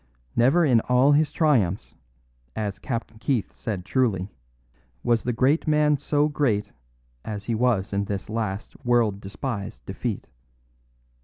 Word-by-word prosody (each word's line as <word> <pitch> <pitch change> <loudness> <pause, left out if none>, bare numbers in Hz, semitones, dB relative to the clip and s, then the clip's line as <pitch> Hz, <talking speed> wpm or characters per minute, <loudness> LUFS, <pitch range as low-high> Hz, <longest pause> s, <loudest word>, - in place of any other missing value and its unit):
Never 140 +9 +4
in 125 -5 +5
all 125 +3 +5
his 150 0 +3
triumphs, 115 - +1 0.6
as 105 -2 -3
Captain 115 -3 -4
Keith 120 -5 -1
said 95 -5 -4
truly, 100 -5 0 0.7
was 120 -1 +2
the 125 - -1
great 135 +8 +2
man 150 -1 +4
so 145 +1 +1
great 110 -9 0 0.5
as 105 -2 -5
he 115 - -1
was 110 -4 +1
in 100 0 0
this 100 -2 -4
last 110 +1 -4
world 115 -5 +2
despised 100 - -5
defeat. - - -4
115 Hz, 135 wpm, -25 LUFS, 100-135 Hz, 0.7 s, in